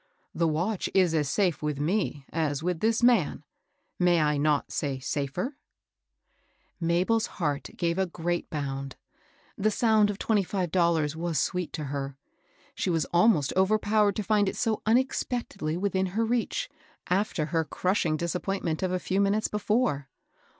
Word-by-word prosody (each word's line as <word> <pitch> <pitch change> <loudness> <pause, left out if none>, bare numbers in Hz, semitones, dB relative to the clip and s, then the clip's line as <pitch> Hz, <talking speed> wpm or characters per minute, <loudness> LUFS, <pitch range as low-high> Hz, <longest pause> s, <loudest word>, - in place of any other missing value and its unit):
The 170 0 +1
watch 175 +6 -1
is 185 -4 +4
as 150 -3 +1
safe 180 -4 +1
with 150 -2 -2
me 150 -3 -1
as 155 -2 -1
with 180 -1 -1
this 225 +4 +1
man, 235 -10 +3 0.3
— - - -48
may 175 -1 +4
I 150 -1 +2
not 145 0 +1
say 140 -2 -2
safer? 145 - -3 0.6
" - - -41
MabePs 180 +7 +2
heart 150 -4 -1
gave 170 +1 0
a 190 - +1
great 175 0 -3
bound. 135 -2 -4 0.6
The 215 - +3
sound 215 -1 +3
of 205 - -3
twenty 215 -1 +2
five 185 -2 -2
dollars 165 -4 +2
was 165 -1 -2
sweet 180 +5 -1
to 155 - -4
her. 135 -1 -4 0.6
She - - -2
was 165 -4 +1
almost 170 -6 +4
overpowered 205 +1 +3
to 215 - -2
find 205 -1 +2
it - - -6
so 225 -3 0
unexpectedly 230 - 0
within 190 0 0
her 220 +5 0
reach, 235 0 -1 0.4
after 185 -4 0
her 165 -1 +3
crushing 175 0 0
disappoint 180 +4 -2
ment 160 -2 -1
of 185 -1 0
a 185 - +1
few 190 +2 0
minutes 205 +2 +2
before. 210 - 0
180 Hz, 165 wpm, -27 LUFS, 155-205 Hz, 0.6 s, is